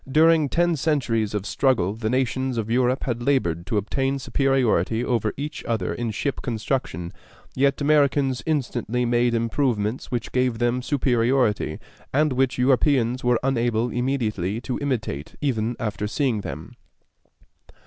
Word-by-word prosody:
During 160 0 +4
ten 175 +2 +2
centuries 120 -8 0
of 105 -1 -2
struggle 115 -7 +1
the 110 0 -3
nations 130 0 0
of 115 0 -2
Europe 125 +1 +2
had 120 -2 -2
labored 100 - 0
to 105 - 0
obtain 135 +7 0
superiority 125 -6 +1
over 115 -3 0
each 150 +1 -5
other 110 -6 -1
in 120 -1 -3
ship 130 +5 -2
construction; 110 - -3 0.4
yet 140 +1 +2
Americans 140 -3 +2
instantly 125 -5 -1
made 120 0 +2
improvements 115 -1 -1
which 120 -2 -3
gave 125 -2 +1
them 120 +2 0
superiority, 125 - +1 0.3
and 150 0 +2
which 130 0 +1
Europeans 125 -1 +2
were 125 -1 +3
unable 120 -3 +1
immediately 115 -6 -1
to 125 0 -3
imitate 110 - -3
even 120 -5 -1
after 105 -1 -2
seeing 120 -1 0
them. - - -7
125 Hz, 140 wpm, -24 LUFS, 110-135 Hz, 0.4 s, During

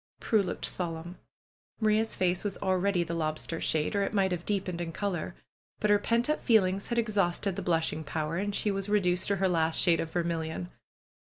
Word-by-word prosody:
Prue 220 -2 +2
looked 185 - -3
solemn. 170 0 -4 0.6
Maria's 220 0 +2
face 180 -1 +1
was 205 -2 -2
already 185 -1 +1
the 170 0 -5
lobster 160 0 -2
shade, 155 +6 0
or 200 - +2
it 200 +2 -1
might 190 -2 +2
have 175 -1 -3
deepened 190 -4 -1
in 165 -1 -3
color. 180 -2 -3 0.4
But 210 - +2
her 205 - +5
pent 235 +3 +1
up 305 - -1
feel 220 -4 +5
ings 190 +2 -2
had 235 - -2
exhausted 200 -4 +1
the - - -3
blushing 160 -2 0
power 155 +2 -3
and 200 +1 -2
she 210 - +1
was 195 0 -2
re 210 0 +4
duced 180 -1 +1
to 200 - +2
her 190 0 +1
last 165 -2 +2
shade 170 -2 +4
of 165 - -2
vermilion. 170 0 -2
185 Hz, 205 wpm, -29 LUFS, 170-205 Hz, 0.6 s, her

